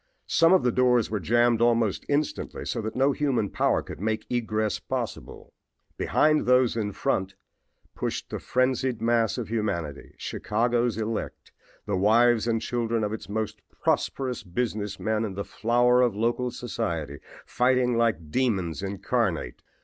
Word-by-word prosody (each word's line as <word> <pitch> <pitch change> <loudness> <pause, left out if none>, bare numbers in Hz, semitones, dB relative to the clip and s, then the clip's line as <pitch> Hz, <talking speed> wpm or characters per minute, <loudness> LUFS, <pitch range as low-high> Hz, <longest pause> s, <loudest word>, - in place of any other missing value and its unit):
Some 165 +1 +4
of 190 - +5
the 125 - +3
doors 125 -2 +2
were 105 - 0
jammed 120 +4 +2
almost 115 -4 +2
instantly 145 +1 -2
so - - -2
that 110 0 -5
no 135 +2 +3
human 135 -8 0
power - - +1
could - - -9
make 110 +1 -1
egress 110 -4 -1
possible. - - -5 0.4
Behind 155 -2 +2
those 125 -2 +4
in 105 -3 -1
front 95 0 -1 0.6
pushed - - -4
the - - -3
frenzied 130 -1 0
mass 115 -1 +1
of 120 -4 -4
humanity, 85 -10 -3
Chicago's 120 +1 0
elect, 110 0 -4 0.3
the 105 - -1
wives 115 +3 +4
and 115 -1 0
children 115 -2 -1
of 105 0 -1
its 110 - -7
most 110 0 -3 0.2
prosperous 130 -3 0
business 105 +1 -3
men 110 0 0
and 100 -4 -4
the 100 - -4
flower 120 +3 +3
of 120 -5 +2
local 120 +3 0
society, 85 - -4 0.3
fighting 125 -1 +2
like 105 -10 0
demons 95 -10 0
incarnate. 100 -1 -2
115 Hz, 150 wpm, -26 LUFS, 105-125 Hz, 0.6 s, of